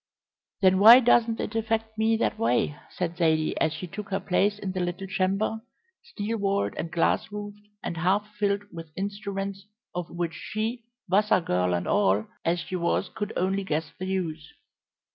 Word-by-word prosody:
"Then 190 -1 +5
why 230 +5 +10
doesn't 235 -2 +3
it - - -3
affect 225 0 -1
me 220 +1 +2
that - - -1
way?" 120 +5 +1
said 175 -1 -3
Zaidie, 160 -2 +2
as 155 - +3
she 165 +3 -5
took 200 +4 -7
her 195 0 0
place 200 +2 +1
in 195 -2 -4
the 185 - -3
little 180 +2 -2
chamber, 195 +3 0 0.4
steel 215 +3 -4
walled 200 0 0
and 165 - -4
glass 170 +4 +1
roofed, 205 0 -8 0.2
and 170 - -4
half 190 +5 +1
filled 205 -1 0
with 165 -1 -8
instruments 200 0 -4 0.3
of 175 -1 -4
which 170 -1 -3
she, 225 +2 -4 0.2
Vassar 200 +2 +4
girl 90 - +1
and 90 0 -3
all 105 +1 +3 0.2
as 170 +1 +1
she 185 - -5
was, 180 +2 0
could 210 0 -4
only 190 +2 0
guess 160 -3 -2
the 185 - -3
use. 165 -5 -3
195 Hz, 175 wpm, -27 LUFS, 170-210 Hz, 0.4 s, why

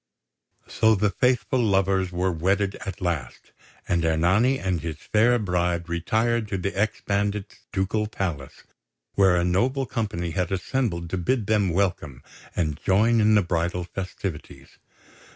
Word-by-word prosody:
So 110 0 +3
the 105 0 +1
faithful 125 -1 +1
lovers 95 -3 +1
were 90 +1 0
wedded 95 +4 0
at 95 - -6
last; 85 -9 -4 0.4
and 85 -1 +1
Ernani 90 +11 +3
and 95 -8 -2
his 80 -2 -4
fair 115 +8 +2
bride 90 -4 -1
retired 110 +7 0
to 100 - -2
the 95 +2 -3
ex 105 +2 -1
bandit's 100 0 -2
ducal 105 +3 -1
palace, 85 -10 -5 0.5
where 95 -3 +4
a 85 - +2
noble 125 +10 +1
company 100 -8 -3
had 90 +3 -2
assembled 95 -4 -2
to 95 - -1
bid 115 +5 0
them 105 -2 +2
welcome 85 -8 -1 0.3
and 75 -4 -1
join 110 +4 +3
in 110 0 +4
the 105 - +4
bridal 85 +1 -1
festivities. 90 -2 -7
95 Hz, 145 wpm, -25 LUFS, 85-105 Hz, 0.5 s, where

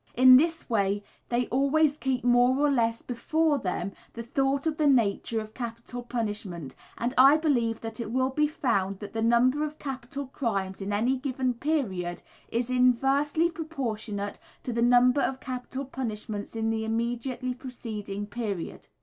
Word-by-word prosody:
In 255 +1 +9
this 325 +4 +3
way 205 -3 +1 0.3
they 245 +1 +1
always 280 +3 +3
keep 265 -4 -1
more 245 +1 +4
or 290 0 +3
less 230 -3 +1
before 295 +5 +1
them 185 -2 -2 0.2
the 230 - -6
thought 270 +4 0
of 315 -1 0
the 305 - +3
nature 230 -3 +2
of 215 0 -8
capital 235 0 -6
punishment, 210 - -4 0.2
and 240 +2 -1
I 275 +3 +8
believe 240 -8 +1
that 225 0 -6
it 230 -3 -4
will 260 +2 +1
be 300 +3 +2
found 200 -10 0
that 205 +1 -9
the 225 - -2
number 245 +5 +3
of 305 0 -4
capital 270 0 -5
crimes 200 -8 -3
in 195 +1 -3
any 235 +6 +1
given 255 -1 -1
period 230 - -2 0.3
is 240 +2 -1
inversely 270 +6 +3
proportionate 225 -11 -4 0.2
to 250 - -3
the 235 - 0
number 245 +3 +5
of 265 0 -1
capital 260 +1 -5
punishments 215 -5 -5
in 225 0 0
the 220 0 -1
immediately 240 +3 -2
preceding 220 -6 -6
period. 205 -5 -5
245 Hz, 160 wpm, -27 LUFS, 220-270 Hz, 0.3 s, In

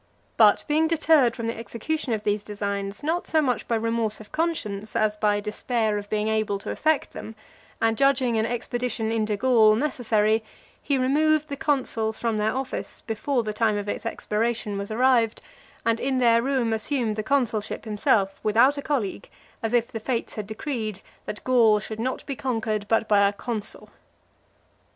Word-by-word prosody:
But 210 -2 +5
being 310 +1 +2
deterred 310 -6 +3
from 230 -3 -4
the 230 - -2
execution 235 +6 -3
of 215 -2 -1
these 205 0 0
designs 200 0 -4
not 330 +4 -1
so 315 - +2
much 260 -5 0
by 235 - +1
remorse 225 -1 -1
of 215 - -13
conscience, 220 -11 -2
as 215 -1 +2
by 210 -1 +1
despair 215 0 -1
of 205 0 -10
being 215 0 0
able 215 -2 0
to 195 - -6
effect 315 -1 0
them, 220 - -8 0.4
and 225 0 +2
judging 260 -2 +2
an 220 0 +1
expedition 240 -1 -2
into 215 -2 0
Gaul 225 -2 +5
necessary, 220 -5 +1 0.4
he 280 - 0
removed 305 +4 +2
the 280 - -3
consuls 250 -7 -1
from 230 -2 -1
their 210 +1 +1
office, 260 +1 -4
before 240 +3 -1
the 215 -1 -3
time 215 -1 +1
of 205 0 -4
its - - -3
expiration 225 -1 -2
was 200 0 -4
arrived; 235 -1 +2 0.5
and 230 0 +2
in 265 0 0
their 235 -2 +4
room 255 -3 0
assumed 225 0 -1
the 215 - -2
consulship 230 -4 -1
himself 205 -2 +1
without 240 +7 +4
a - - -3
colleague, 255 -9 -2 0.3
as 225 - -2
if 240 0 +1
the 225 - -4
fates 235 +1 -3
had 210 -2 -5
decreed 215 -3 -4 0.3
that 210 - -6
Gaul 235 -4 +5
should 220 +2 -7
not 255 +3 -3
be 275 - -4
conquered, 220 -5 -2
but 225 0 +2
by 200 -1 +5
a 200 - -1
consul. 215 0 -6
225 Hz, 180 wpm, -25 LUFS, 215-255 Hz, 0.5 s, But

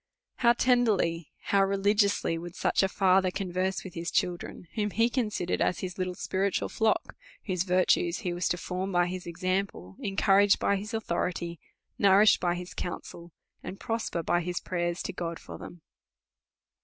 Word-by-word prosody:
How 235 -1 +5
tenderly, 215 - +2
how 200 -1 +2
religiously, 200 -2 +2
would 175 +2 -7
such - - +1
a 195 - +3
father 190 -1 +3
con 185 0 -4
verse 185 +1 -1
with 190 - -9
his 170 0 -3
children, 175 0 -2
whom 210 -2 -1
he 230 +3 +2
considered 210 -8 -1
as 180 - +1
his 185 -1 -5
little 185 -1 -2
spiritual 195 +1 -1
flock, 220 -1 0 0.3
whose 185 -4 -1
virtues 180 -1 +2
he 175 - 0
was 175 +1 -1
to 175 - 0
form 185 +2 -3
by 175 -1 +3
his 180 0 -5
example, 185 - -3
encourage 200 0 +4
by 200 - +1
his 210 +3 -5
authority, 170 -5 -2 0.4
nourish 200 +1 +6
by 175 -1 0
his 180 0 -7
counsel, 170 -1 -6 0.3
and 195 - -7
prosper 225 -7 -2
by 175 +2 +1
his 175 +1 -2
prayers 175 -1 -2
to - - -4
God 170 -2 -4
for - - -10
them 175 -2 -11
185 Hz, 165 wpm, -28 LUFS, 175-200 Hz, 0.4 s, nourish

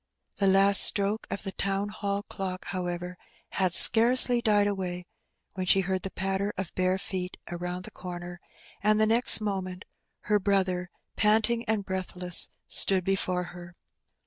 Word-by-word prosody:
The 200 - 0
last 195 +1 +4
stroke 205 +2 +3
of - - -6
the 195 - -3
Town 195 +1 -3
Hall 200 -1 -5
clock, 185 -3 -7
however, 180 -1 -6 0.3
had 185 -2 -1
scarcely 240 +5 +6
died 210 -3 +1
away 185 -3 -5 0.5
when 185 -1 -6
she 195 - +4
heard 190 0 -3
the 195 - -6
patter 195 +2 -4
of 190 -2 -6
bare 185 0 -1
feet 185 -1 -6
around 180 +1 -6
the - - -8
comer, 175 -1 -10 0.4
and 215 +1 +1
the 215 - +3
next 225 +1 +5
moment 190 -3 -5 0.4
her 210 0 -1
brother, 185 -3 -2 0.3
panting 220 +2 +1
and 215 -2 -3
breathless, 185 -2 +1 0.2
stood 190 -2 +2
before 185 -1 -2
her. 175 0 -13
190 Hz, 150 wpm, -26 LUFS, 180-205 Hz, 0.5 s, scarcely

